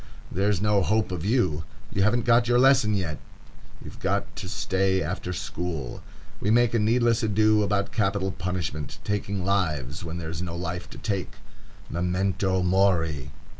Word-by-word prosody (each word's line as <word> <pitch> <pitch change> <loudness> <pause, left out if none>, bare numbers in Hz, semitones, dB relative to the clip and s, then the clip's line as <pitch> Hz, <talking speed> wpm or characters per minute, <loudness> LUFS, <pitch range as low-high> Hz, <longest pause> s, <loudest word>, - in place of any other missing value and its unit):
there's 100 0 +1
no 105 0 +3
hope 110 +1 +1
of 90 -3 -3
you. 95 - +1 0.3
You 100 - 0
haven't 115 +4 +2
got 120 0 +4
your 120 0 +4
lesson 130 -5 +5
yet. 85 -6 -2 0.7
You've - - -10
got - - -1
to 95 - -5
stay 95 -1 +1
after 90 +2 -3
school. 85 -6 -4 0.4
We 100 - -1
make 120 +1 +4
a 115 - +3
needless 115 +2 +3
ado 110 0 +3
about 100 -1 0
capital 100 -2 0
punishment,—taking 95 +2 -3
lives, 80 -8 -1
when 85 0 -5
there 80 -2 -5
is 80 0 -4
no 85 -2 -4
life 85 0 -4
to - - -11
take. 100 -6 -3 0.6
_Memento 95 +2 0
mori! 85 -7 +2
95 Hz, 155 wpm, -26 LUFS, 90-105 Hz, 0.7 s, lesson